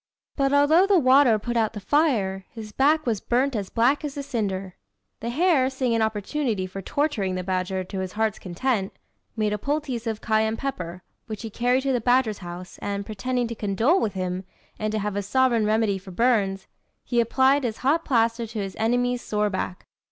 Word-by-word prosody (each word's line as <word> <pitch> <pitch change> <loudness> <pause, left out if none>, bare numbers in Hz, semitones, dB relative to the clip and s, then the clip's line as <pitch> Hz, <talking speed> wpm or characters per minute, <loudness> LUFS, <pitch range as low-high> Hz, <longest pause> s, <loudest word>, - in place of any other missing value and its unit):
But, 275 -1 +1
although 300 +6 +5
the 395 -2 +5
water 260 -5 +5
put 240 +3 -4
out 225 -2 +1
the 210 - -5
fire, 205 - +1
his 220 -2 -9
back 300 +6 +2
was 225 -5 0
burnt 255 +2 +1
as 200 -3 -3
black 250 +6 +2
as 290 -1 -5
a 280 - -3
cinder. 195 -7 -3 0.5
The 230 - -4
hare, 285 -1 +3
seeing 260 -3 -1
an 230 - +1
opportunity 220 0 -1
for 190 +1 -7
torturing 215 - -1
the 185 - -3
badger 185 0 -1
to 190 +1 -6
his 185 -1 -4
heart's 220 -1 0
content, 195 +2 -2 0.4
made 210 -1 +1
a 210 - -2
poultice 275 -3 -2
of 220 -1 -2
cayenne 220 0 +1
pepper, 180 -10 -5 0.2
which 215 0 -6
he 225 - -6
carried 245 +4 +1
to 270 -1 +1
the 245 - 0
badger's 245 -3 +2
house, 180 0 -9
and, 200 0 -3
pretending 245 +4 -2
to - - -3
condole 225 - +1
with 205 -3 -1
him, 185 0 -3 0.4
and 215 0 -1
to 215 - -1
have 210 -1 -2
a 205 - 0
sovereign 235 +1 +2
remedy 215 -2 +1
for 190 +1 -13
burns, 195 -2 +1 0.4
he 240 -1 +1
applied 265 +4 +3
his 225 -3 -2
hot 320 +5 +3
plaister 230 -3 +1
to 220 +1 -8
his 195 -2 -4
enemy's 245 +2 +1
sore 210 -1 -1
back. 185 -1 -4
225 Hz, 200 wpm, -25 LUFS, 200-260 Hz, 0.5 s, although